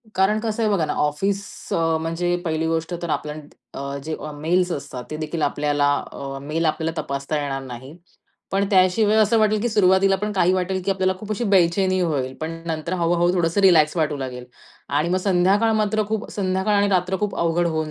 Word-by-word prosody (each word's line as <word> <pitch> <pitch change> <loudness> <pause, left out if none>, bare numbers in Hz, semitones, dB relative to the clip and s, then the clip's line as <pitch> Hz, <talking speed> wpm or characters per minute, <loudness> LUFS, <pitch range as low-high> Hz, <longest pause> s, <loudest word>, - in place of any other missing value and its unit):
कारण 195 +3 +3
कसं 225 0 -2
आहे 215 - +2
बघा 170 -6 +1
ना, - - -2
ऑफिस 195 +7 0 0.3
अ, 165 -1 +1
म्हणजे 175 +2 -1
पहिली 160 0 -1
गोष्ट 165 +1 -2
तर, 170 - -4
आपल्या 150 0 -2 0.4
अ, 140 0 -4
जे 155 0 -3 0.2
मेल्स 175 +5 0
असतात, 140 -4 -5
ते 155 - -3
देखील 155 +1 -4
आपल्याला 145 0 +1 0.2
अ, 135 0 -6
मेल 155 +4 -2
आपल्याला 160 +1 -1
तपासता 140 +2 -3
येणार 135 -1 -3
नाही. 130 +4 -9 0.6
पण 195 +1 +2
त्याशिवाय 200 +3 +4
असं 220 +1 +4
वाटेल, 215 -1 +2
की 240 - 0
सुरुवातीला 195 -2 +4
पण 210 +2 -3
काही 185 -2 +3
वाटेल, 185 0 -1
की 200 - 0
आपल्याला 190 -1 +1
खूप 210 +1 -9
अशी 225 +3 -2
बेचैनी 185 +1 +3
होईल. 140 -7 -1
पण 165 +1 -5
नंतर, 160 +1 -3
हळू-हळू 175 +1 +2
थोडंसं 170 +2 +1
रिलॅक्स 165 -5 +5
वाटू 155 -3 0
लागेल. 125 -2 -6 0.4
आणि 150 +4 0
मग 180 - +1
संध्याकाळ 195 +4 +2
मात्र 215 +1 +1
खूप, 220 +1 -3
संध्याकाळ 190 +1 0
आणि 200 0 +3
रात्र 185 -1 +1
खूप 205 -2 -1
अवघड 170 +1 +1
होऊन 160 -2 -2
175 Hz, 195 wpm, -22 LUFS, 155-195 Hz, 0.6 s, रिलॅक्स